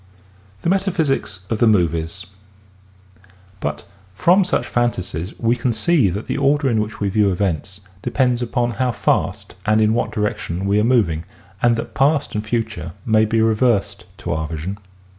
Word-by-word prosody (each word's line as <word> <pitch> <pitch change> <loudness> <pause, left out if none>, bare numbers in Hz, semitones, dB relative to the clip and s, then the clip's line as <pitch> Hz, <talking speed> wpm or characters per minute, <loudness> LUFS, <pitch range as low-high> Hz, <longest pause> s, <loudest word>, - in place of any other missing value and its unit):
THE - - +1
METAPHYSICS 160 - 0
OF 110 - 0
THE 120 - +4
MOVIES 85 -2 +1 1.3
But 75 -1 -4 0.3
from 180 - +4
such 180 - 0
fantasies 95 -7 -2
we 115 +1 +2
can 125 0 0
see 115 - +3
that 100 +5 -4
the - - -2
order 140 +1 +2
in 110 -2 +2
which 105 +1 -5
we 100 - 0
view 100 0 +2
events 95 +1 -2 0.2
depends 125 -2 +1
upon 120 0 0
how 125 0 -1
fast - - -1
and 110 +1 +3
in 110 0 +3
what 120 - 0
direction 100 -4 -2
we 100 +1 +2
are - - +2
moving 105 -10 +2 0.4
and 120 -1 +4
that 115 - -5
past 145 +2 +2
and 105 - -2
future 110 -6 -3
may 110 -1 +4
be 110 +1 +1
reversed 110 -1 +1
to - - -5
our 80 0 -2
vision. 85 +6 -5
110 Hz, 165 wpm, -20 LUFS, 95-120 Hz, 1.3 s, THE